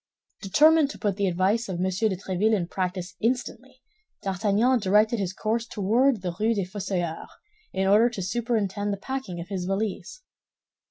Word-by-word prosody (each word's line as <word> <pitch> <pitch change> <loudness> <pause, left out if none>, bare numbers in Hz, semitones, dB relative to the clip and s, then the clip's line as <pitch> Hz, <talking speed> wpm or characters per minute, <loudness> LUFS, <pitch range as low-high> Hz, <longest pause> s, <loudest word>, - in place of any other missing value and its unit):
Determined 300 +8 +4
to - - -8
put 205 -4 -1
the 200 -1 +1
advice 195 +5 +1
of 185 - -3
M. 175 - -2
de 190 +2 0
Tréville 200 +3 +1
in 175 -4 -2
practice 185 0 -3
instantly, 255 +2 -3 0.4
D'Artagnan 210 +6 +2
directed 210 +3 +3
his 190 -3 -1
course 225 +4 -2
toward 225 +2 +1
the 175 -2 -3
Rue 225 +2 +2
des 200 -3 -1
Fossoyeurs, 185 -4 -3 0.4
in 190 - -1
order 210 +5 +5
to 210 -6 -5
superintend 205 -1 -1
the 200 - -2
packing 260 -5 -5
of 170 +2 -7
his 190 -3 -3
valise. 205 - -3
205 Hz, 165 wpm, -26 LUFS, 185-230 Hz, 0.4 s, order